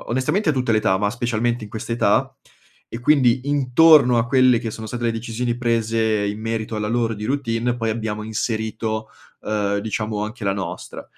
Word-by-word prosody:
o -, -, -11 dB
onestamente 155 Hz, -, +1 dB
a -, -, +1 dB
tutte 130 Hz, -4 st, -1 dB
le 110 Hz, -, +4 dB
età, 95 Hz, -3 st, +2 dB
ma 100 Hz, 0 st, 0 dB
specialmente 120 Hz, -1 st, -1 dB
in 105 Hz, -, -12 dB
questa 110 Hz, -, -7 dB
età, 120 Hz, -, +2 dB, 0.6 s
e 115 Hz, -, -7 dB
quindi 125 Hz, -2 st, +3 dB
intorno 140 Hz, -2 st, +5 dB
a 115 Hz, -, +1 dB
quelle 130 Hz, -2 st, +4 dB
che 115 Hz, -, -4 dB
sono 110 Hz, +1 st, -7 dB
state 120 Hz, +2 st, -5 dB
le 115 Hz, -, +2 dB
decisioni 115 Hz, +1 st, -3 dB
prese 115 Hz, -3 st, 0 dB
in 105 Hz, +1 st, -3 dB
merito 115 Hz, 0 st, -3 dB
alla 105 Hz, 0 st, -2 dB
loro 115 Hz, 0 st, 0 dB
di 105 Hz, 0 st, -7 dB
routine 120 Hz, -2 st, -1 dB
poi 115 Hz, -2 st, -1 dB
abbiamo 110 Hz, -1 st, -3 dB
inserito, 110 Hz, 0 st, -3 dB, 0.3 s
uhm, 105 Hz, -1 st, -1 dB
diciamo 105 Hz, 0 st, -3 dB
anche 110 Hz, 0 st, -7 dB
la 100 Hz, -, +1 dB
nostra. 95 Hz, -2 st, -6 dB
115 Hz, 195 wpm, -21 LUFS, 110-120 Hz, 0.6 s, intorno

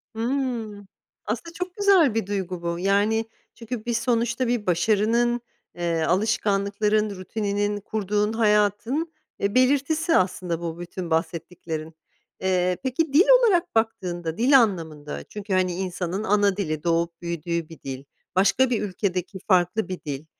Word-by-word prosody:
Hımm. 230 Hz, -5 st, -2 dB, 0.4 s
Aslında 245 Hz, +11 st, -4 dB
çok 360 Hz, +1 st, -5 dB
güzel 385 Hz, -, +4 dB
bir 225 Hz, -4 st, -1 dB
duygu 185 Hz, -3 st, -3 dB
bu. 170 Hz, 0 st, -2 dB
Yani 205 Hz, +4 st, +2 dB, 0.3 s
çünkü 230 Hz, -1 st, -6 dB
bir 240 Hz, -, -1 dB
sonuçta 235 Hz, +1 st, 0 dB
bir 235 Hz, -3 st, -1 dB
başarının, 225 Hz, +6 st, +2 dB, 0.3 s
eee, 170 Hz, -2 st, -1 dB
alışkanlıkların 210 Hz, +2 st, +1 dB
rutininin 205 Hz, +1 st, -2 dB
kurduğun 210 Hz, 0 st, -1 dB
hayatın, 225 Hz, -, +1 dB, 0.3 s
e, 200 Hz, +1 st, 0 dB
belirtisi 285 Hz, +6 st, +3 dB
aslında 180 Hz, -2 st, -1 dB
bu 165 Hz, 0 st, -5 dB
bütün 175 Hz, 0 st, -6 dB
bahsettiklerin. 160 Hz, -1 st, -3 dB, 0.5 s
Eee, 180 Hz, -1 st, +1 dB
peki 275 Hz, +3 st, -1 dB
dil 335 Hz, +7 st, +6 dB
olarak 365 Hz, -, +2 dB
baktığında, 175 Hz, -7 st, -1 dB
dil 265 Hz, +3 st, +6 dB
anlamında, 160 Hz, -9 st, -2 dB
çünkü, 210 Hz, -1 st, -6 dB
hani, 185 Hz, -1 st, +2 dB
insanın 185 Hz, +1 st, -3 dB
ana 205 Hz, -2 st, +2 dB
dili, 155 Hz, -6 st, -2 dB
doğup 170 Hz, 0 st, 0 dB
büyüdüğü 170 Hz, -1 st, -3 dB
bir 165 Hz, -, -12 dB
dil, 135 Hz, 0 st, -6 dB, 0.3 s
başka 200 Hz, +7 st, +4 dB
bir 235 Hz, -4 st, 0 dB
ülkedeki 190 Hz, -1 st, -3 dB
farklı 185 Hz, +3 st, +2 dB
bir 185 Hz, -, -4 dB
dil, 145 Hz, 0 st, -5 dB
205 Hz, 135 wpm, -24 LUFS, 175-230 Hz, 0.5 s, dil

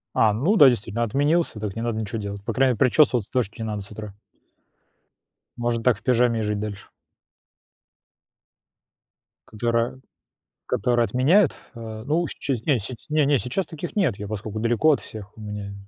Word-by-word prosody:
А, 110 Hz, -2 st, +4 dB
ну 160 Hz, -, +1 dB
да, 145 Hz, -6 st, +9 dB
действительно, 115 Hz, -1 st, 0 dB
отменился, 145 Hz, +1 st, +1 dB
так 105 Hz, -1 st, -4 dB
не 115 Hz, -, -3 dB
надо 115 Hz, -2 st, -1 dB
ничё 110 Hz, +1 st, -4 dB
делать. 100 Hz, -1 st, -6 dB
По 115 Hz, -, -2 dB
крайней, 130 Hz, 0 st, +2 dB
причёсываться 125 Hz, -2 st, +3 dB
точно 120 Hz, -6 st, -1 dB
не -, -, -3 dB
надо 105 Hz, -2 st, -3 dB
с 100 Hz, -, -10 dB
утра. 105 Hz, -1 st, -8 dB, 1.5 s
Можно 120 Hz, -1 st, -1 dB
так 120 Hz, -4 st, +3 dB
в -, -, -21 dB
пижаме 120 Hz, -2 st, +2 dB
и -, -, -1 dB
жить 105 Hz, -1 st, -1 dB
дальше. 105 Hz, -2 st, -6 dB, 2.6 s
Которая 115 Hz, +3 st, -1 dB, 0.7 s
которая 120 Hz, +2 st, +1 dB
отменяет. 140 Hz, -, +3 dB, 0.2 s
А, 110 Hz, -1 st, -8 dB
ну, 160 Hz, +5 st, +1 dB
сче 135 Hz, -, -2 dB
не 140 Hz, -5 st, +3 dB
с 100 Hz, -, -6 dB, 0.2 s
не, 150 Hz, -1 st, +2 dB
не, 145 Hz, -2 st, +3 dB
сейчас 140 Hz, +10 st, -2 dB
таких 165 Hz, +5 st, -7 dB
нет, 155 Hz, -, +2 dB
я 105 Hz, -1 st, -6 dB
поскольку 110 Hz, 0 st, -5 dB
далеко 120 Hz, +7 st, +3 dB
от -, -, +1 dB
всех, 105 Hz, -1 st, -10 dB
у -, -, -12 dB
меня 105 Hz, -1 st, -6 dB
115 Hz, 170 wpm, -24 LUFS, 105-130 Hz, 2.6 s, да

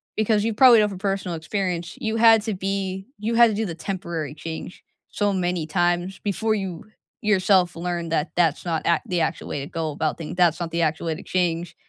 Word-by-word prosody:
because 215 Hz, 0 st, +1 dB
you 225 Hz, -, 0 dB
probably 240 Hz, 0 st, +7 dB
know 210 Hz, -, +4 dB
from 190 Hz, -3 st, -7 dB
personal 195 Hz, -3 st, -2 dB
experience 170 Hz, 0 st, -3 dB
you 220 Hz, 0 st, -2 dB
had 225 Hz, -1 st, +6 dB
to 220 Hz, -1 st, -2 dB
be 190 Hz, 0 st, -3 dB
you 225 Hz, +2 st, -1 dB
had 235 Hz, 0 st, +7 dB
to 215 Hz, -, -2 dB
do 220 Hz, +1 st, -1 dB
the 170 Hz, -, -5 dB
temporary 170 Hz, -5 st, -4 dB
change 160 Hz, +3 st, -8 dB, 0.3 s
so 205 Hz, -1 st, 0 dB
many 175 Hz, -3 st, -1 dB
times, 175 Hz, +2 st, 0 dB
before 215 Hz, +2 st, 0 dB
you 185 Hz, -5 st, -5 dB, 0.4 s
yourself 190 Hz, -4 st, +3 dB
learned 170 Hz, -1 st, -3 dB
that 155 Hz, -1 st, 0 dB
that's 165 Hz, -4 st, +2 dB
not 165 Hz, -2 st, -1 dB
act 170 Hz, -, +1 dB
the 180 Hz, -, 0 dB
actual 160 Hz, +1 st, -2 dB
way 145 Hz, -, -3 dB
to 140 Hz, -, -5 dB
go 165 Hz, -2 st, -3 dB
about 155 Hz, +1 st, -2 dB
things, 165 Hz, +1 st, -6 dB
that's 175 Hz, -2 st, +3 dB
not 165 Hz, -, -3 dB
the 170 Hz, -, -1 dB
actual 160 Hz, +1 st, 0 dB
way 160 Hz, -, -1 dB
to -, -, -10 dB
change. 175 Hz, -2 st, -1 dB
180 Hz, 215 wpm, -23 LUFS, 165-205 Hz, 0.4 s, probably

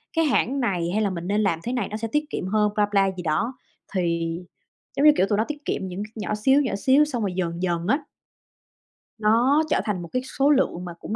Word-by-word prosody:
cái 325 Hz, 0 st, +3 dB
hãng 275 Hz, -1 st, +1 dB
này, 185 Hz, -9 st, 0 dB
hay 215 Hz, -, +1 dB
là 205 Hz, -, +1 dB
mình 175 Hz, -2 st, -5 dB
nên 205 Hz, +2 st, +1 dB
làm 195 Hz, -6 st, +1 dB
thế 245 Hz, -, -3 dB
này 240 Hz, -6 st, -1 dB
mình 215 Hz, -, -4 dB
sẽ 225 Hz, +1 st, -3 dB
tiết 300 Hz, 0 st, +1 dB
kiệm 185 Hz, -, -4 dB
hơn 210 Hz, +1 st, +2 dB
blah, 205 Hz, -1 st, +2 dB
blah 195 Hz, -2 st, +2 dB
gì 180 Hz, -, -5 dB
đó. 170 Hz, +10 st, 0 dB, 0.4 s
Thì, 170 Hz, -2 st, 0 dB, 0.6 s
giống 285 Hz, -, +3 dB
như, 300 Hz, -, +10 dB
kiểu, 190 Hz, -, +3 dB
tụi 205 Hz, -, +2 dB
nó 220 Hz, -, +2 dB
tiết 295 Hz, -1 st, -7 dB
kiệm 190 Hz, -, -2 dB
những 185 Hz, +3 st, -5 dB
c -, -, -16 dB
nhỏ 210 Hz, 0 st, -2 dB
xíu, 265 Hz, +7 st, +3 dB
nhỏ 255 Hz, -7 st, -1 dB
xíu 265 Hz, +8 st, +4 dB
xong 255 Hz, -6 st, -3 dB
rồi 190 Hz, -, -1 dB
dần 175 Hz, -1 st, -2 dB
dần 175 Hz, -1 st, -1 dB
á 275 Hz, +7 st, +3 dB, 1.2 s
nó 240 Hz, +8 st, +3 dB
trở -, -, +2 dB
thành 205 Hz, -5 st, -2 dB
một 170 Hz, -, -7 dB
cái 255 Hz, -, +1 dB, 0.2 s
số 275 Hz, +2 st, +4 dB
lượng 260 Hz, -11 st, +1 dB
mà 175 Hz, -, -6 dB
cũng 220 Hz, -, -5 dB
210 Hz, 255 wpm, -24 LUFS, 185-260 Hz, 1.2 s, như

